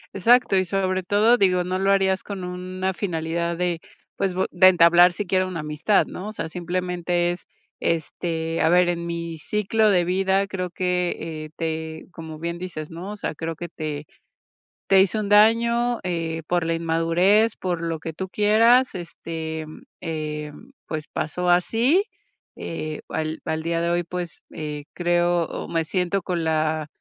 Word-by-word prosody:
Exacto. 235 +2 +4
Y, 185 - +2
sobre 185 +1 0
todo, 210 +6 +4
digo, 185 -4 +3
no 185 +1 -2
lo 195 +1 +2
harías 190 -1 +2
con 200 -3 -6
una 185 +1 -3
finalidad 170 -2 -2
de 175 -2 -1 0.3
pues 190 -2 -1
bue 190 - +1
de 185 +1 +6
entablar 175 0 +7
siquiera 185 0 0
una 175 -4 -4
amistad, 150 +7 +1
¿no? 190 - -7
O - - -4
sea, 215 - -4
simplemente 175 0 -1
es, 175 - -7 0.3
este, 165 0 -2
a 160 - +4
ver: 180 +1 +4
"En 170 -1 -2
mi 170 -1 -4
ciclo 210 +4 +1
de 180 -3 +3
vida, 190 +2 +2
creo 185 -2 -4
que, 180 0 0 0.3
eh, - - -11
te". 160 -1 -4
Como 160 -2 -8
bien 170 +2 -4
dices, 170 -4 -6
¿no? 175 +5 -7
O - - -9
sea: - - -3
"Creo 165 +1 -4
que 175 +2 -7
te 155 -2 -5 0.8
te 195 -1 +6
hice 200 +3 +1
un 210 - -2
daño, 235 +3 +4
eh, 165 -2 -2
por 175 -1 +1
la 165 - 0
inmadurez, 170 +7 +2
por 175 -3 -2
lo 165 -1 -2
que 160 +1 -6
tú 190 +4 -5
quieras, 225 +6 +4
este, 160 -2 -5 0.3
eh, 150 -2 -4 0.4
pues 155 -1 -4
pasó 180 +4 -1
así. 230 - +3 0.5
Eh, 155 -2 -5
al 155 0 -3
al 160 0 -2
día 165 +1 -1
de 170 - 0
hoy, 175 0 +1
pues, 175 -1 -6
eh, 150 -2 -5
creo, 175 0 +2
o - - -6
me 165 -1 0
siento 180 +3 -1
con 175 -2 -2
la 155 -1 0
175 Hz, 170 wpm, -23 LUFS, 165-190 Hz, 0.8 s, entablar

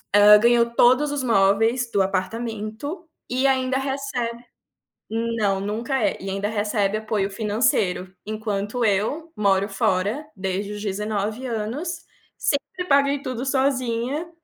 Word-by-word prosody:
hã, 210 +1 +9
ganhou 235 +1 +5
todos 255 +5 +4
os 285 -2 -2
móveis 225 +3 +3
do 195 -1 +3
apartamento, 220 - -4 0.2
e 255 +2 +1
ainda 260 -1 +1
recebe 265 -4 -3 0.7
não, 225 -3 0
nunca 225 +6 -2
é, 200 - 0
e 195 - -6
ainda 195 +2 -2
recebe 210 -1 0
apoio 215 -2 -1
financeiro. 205 -3 0
Enquanto 215 +2 -2
eu 225 +11 0
moro 200 -1 +2
fora, 200 +7 0
desde 190 +2 -3
os 205 0 -6
19 210 +3 -2
anos, 255 +10 -4 0.3
sempre 295 +6 -2
paguei 280 -2 +3
tudo 255 0 -4
sozinha, 265 +2 0
225 Hz, 125 wpm, -23 LUFS, 205-265 Hz, 0.7 s, hã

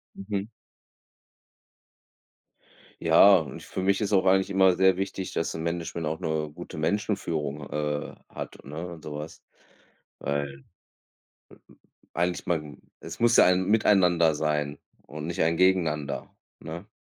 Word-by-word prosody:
Mhm. 100 +1 -4 2.5
Ja, 100 -1 +7
und 80 - -5
für 95 - -5
mich 100 +2 +2
ist 105 0 -1
auch 95 -1 +3
eigentlich 95 +1 +3
immer 95 -2 +4
sehr 95 0 +4
wichtig, 95 -1 -4
dass 80 - -2
'n 80 - -5
Management 85 -1 -3
auch 80 +1 -3
'ne 80 -1 -2
gute 85 -1 -9
Menschenführung 80 -6 -2
h 75 -1 -2
äh, - - -16 0.2
hat, - - -7
ne 80 +5 -6
und 80 - -13
sowas. 75 +1 -7 0.8
Weil 70 -1 -3 1.5
eigentlich 90 +1 -1
mein 75 -4 -3 0.2
es 80 0 -9
muss 120 0 +4
ja - - +8
ein 90 +1 +3
Miteinander 90 -7 +4
sein 75 -1 -1 0.3
und 75 +1 -7
nicht 85 - -2
ein 80 +1 +2
Gegeneinander, 75 -7 +1 0.3
ne? 85 +6 -8
85 Hz, 135 wpm, -27 LUFS, 75-95 Hz, 2.5 s, ja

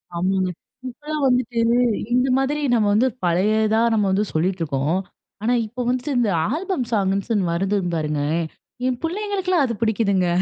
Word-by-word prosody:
ஆமாங்க. 185 +1 0 0.4
இப்பல்லாம் 295 +3 -5
வந்துட்டு, 250 -2 +1 0.5
இந்தமாதிரி 265 +3 +2
நம்ம 215 -3 +3
வந்து 240 +5 +4 0.2
பழையதா 215 +5 +2
நம்ம 210 -2 +2
வந்து 200 +2 +2
சொல்லிட்டு 180 +3 0
இருக்கோம். 145 +3 0 0.5
ஆனா, 240 +2 +2
இப்போ 250 +3 -6
வந்துட்டு 255 +3 -1
இந்த 225 -4 +2 0.2
ஆல்பம் 330 -4 -2
சாங்குன்னு 195 -1 0
வருது 195 +4 0 0.2
பாருங்க. 150 -2 -1 0.7
என் 255 - 0
புள்ளைகளுக்கெல்லாம் 375 -2 0
அது 235 - -2
புடிக்குதுங்க 200 -5 +1
220 Hz, 135 wpm, -22 LUFS, 190-260 Hz, 0.7 s, வந்து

